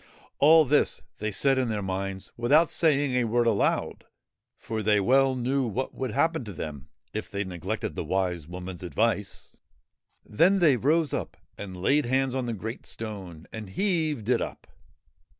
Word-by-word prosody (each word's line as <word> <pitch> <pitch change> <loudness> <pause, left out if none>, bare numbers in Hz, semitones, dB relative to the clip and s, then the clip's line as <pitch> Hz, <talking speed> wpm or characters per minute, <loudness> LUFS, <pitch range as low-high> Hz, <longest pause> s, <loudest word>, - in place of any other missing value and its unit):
All 160 +2 +7
this 145 +3 +1 0.2
they 105 0 -2
said 135 +6 +2
in 125 -2 0
their 105 -2 -2
minds, 95 0 -4
without 145 +8 +3
saying 145 -4 +2
a 125 -1 +2
word 120 +1 +1
aloud, 110 -4 0 0.5
for 110 -1 -4
they 105 0 +3
well 135 +5 +3
knew 130 +1 0
what 125 +5 -3
would 130 -1 -3
happen 160 +6 +1
to 105 - -7
them 75 -5 -7 0.2
if 110 - -4
they 100 -1 -2
neglected 90 -4 -4
the - - -4
Wise 90 -5 -1
Woman's 90 0 -7
advice. 105 +2 -2 0.7
Then 180 - +3
they 160 -7 +5
rose 150 +5 +1
up - - -4 0.2
and 95 -2 -8
laid 140 +9 +2
hands 130 0 +1
on 130 -2 -2
the 120 - -2
great 110 +3 -6
stone 95 -7 -7
and 110 -3 -7
heaved 155 - 0
it 125 -2 +2
up. - - -6
115 Hz, 170 wpm, -27 LUFS, 100-135 Hz, 0.7 s, All